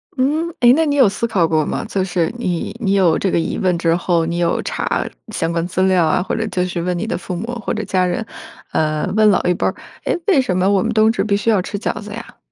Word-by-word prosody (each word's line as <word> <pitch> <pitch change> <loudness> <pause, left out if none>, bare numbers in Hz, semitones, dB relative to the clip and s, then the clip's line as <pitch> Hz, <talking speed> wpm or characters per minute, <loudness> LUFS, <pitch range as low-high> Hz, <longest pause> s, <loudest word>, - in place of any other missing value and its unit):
嗯， 300 +6 0
哎， 240 0 +7
那 325 0 +2
你 290 -1 0
有 260 -6 +6
思 235 +4 -1
考 180 -7 +2
过 155 -1 +2
吗？ - - -3
就 190 -2 -1
是 180 -3 -1
你 180 -1 -2
你 200 -4 0
有 180 -5 +3
这 195 - 0
个 170 - +1
疑 - - -2
问 180 -2 +1
之 165 0 +2
后， 170 -2 +1
你 170 +1 -2
有 170 -1 +1
查 - - -2 0.2
相 165 -6 -2
关 170 0 -1
资 185 +1 -2
料 185 -3 +3
啊， 175 +3 +1
或 - - -3
者 220 -1 -2
就 180 -2 -1
是 175 -1 -3
问 180 0 -1
你 215 - -2
的 - - -2
父 180 0 -6
母 200 +6 -4 0.2
或 - - -2
者 215 -1 -3
家 185 -2 0
人， 180 +5 -2 0.5
呃， 155 -1 0
问 215 -1 +5
老 190 - +3
一 180 - +2
辈 - - -1
儿 - - -2 0.3
哎， - - 0
为 340 -9 +5
什 185 -7 -1
么 185 +1 +2
我 195 -2 +3
们 230 - -1
冬 220 +1 +4
至 - - -1
必 200 -2 +1
须 230 - -1
要 200 -4 +3
吃 205 +2 -5
饺 - - -3
子 210 0 -9
呀？ 230 - -9
185 Hz, 295 characters per minute, -18 LUFS, 175-220 Hz, 0.5 s, 哎